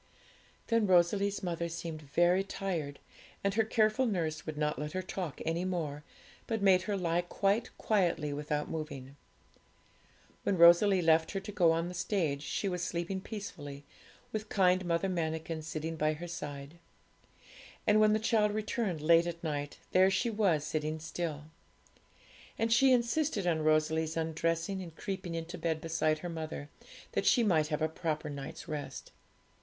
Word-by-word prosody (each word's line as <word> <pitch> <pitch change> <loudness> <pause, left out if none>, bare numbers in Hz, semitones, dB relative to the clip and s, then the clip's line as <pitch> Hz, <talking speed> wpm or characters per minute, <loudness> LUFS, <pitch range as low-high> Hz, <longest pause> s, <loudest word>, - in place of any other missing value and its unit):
Then 230 -2 +2
Rosalie's 195 +3 +3
mother 170 -1 -2
seemed 165 -1 -5
very 175 +6 +2
tired, 175 -8 -3 0.5
and 200 0 +1
her 225 +2 +3
careful 220 +3 +2
nurse 165 -7 -2
would 155 -1 -4
not 150 0 0
let 150 0 -4
her 185 - -1
talk 180 -4 -5
any 165 +2 0
more, 160 -6 -3 0.4
but 225 -1 -1
made 190 -2 +5
her 205 - +1
lie 175 -1 +1
quite 200 +5 0
quietly 170 -8 +1
without 150 0 -2
moving. 140 -4 -6 1.3
When 195 - 0
Rosalie 175 +3 +7
left 160 0 +3
her 195 - -1
to 210 - -7
go 175 -5 +4
on 165 +1 0
the 180 - -6
stage, 170 -6 -1
she 195 - -2
was 180 -2 -2
sleeping 175 +2 -2
peacefully, 145 -10 -7 0.5
with 215 -1 -4
kind 185 -1 +3
Mother 170 +2 +1
Manikin 160 -2 -2
sitting 160 +1 -4
by 155 0 +2
her 170 +3 -7
side. 145 -1 -7 1.1
And 210 0 +5
when 215 0 +5
the - - +4
child 215 -1 +2
returned 215 - -2
late 165 +2 +5
at 170 0 -5
night, 145 -2 -3
there 185 +1 +5
she 210 +5 0
was 195 -9 +2
sitting 155 0 -2
still. 160 -1 -4 1.1
And 225 0 +2
she 265 +3 +5
insisted 240 - +1
on 165 -3 +1
Rosalie's 155 +1 +2
undressing 165 +3 -1
and 170 -3 -9
creeping 185 -3 -4
into 165 +2 -5
bed 160 -2 -1
beside 160 -1 0
her - - -2
mother, 155 -3 -5 0.4
that - - 0
she 240 - +5
might 160 -8 +3
have 155 0 -1
a - - +3
proper 155 -2 -3
night's 140 +3 -7
rest. 150 -3 -6
170 Hz, 160 wpm, -32 LUFS, 155-195 Hz, 1.3 s, Rosalie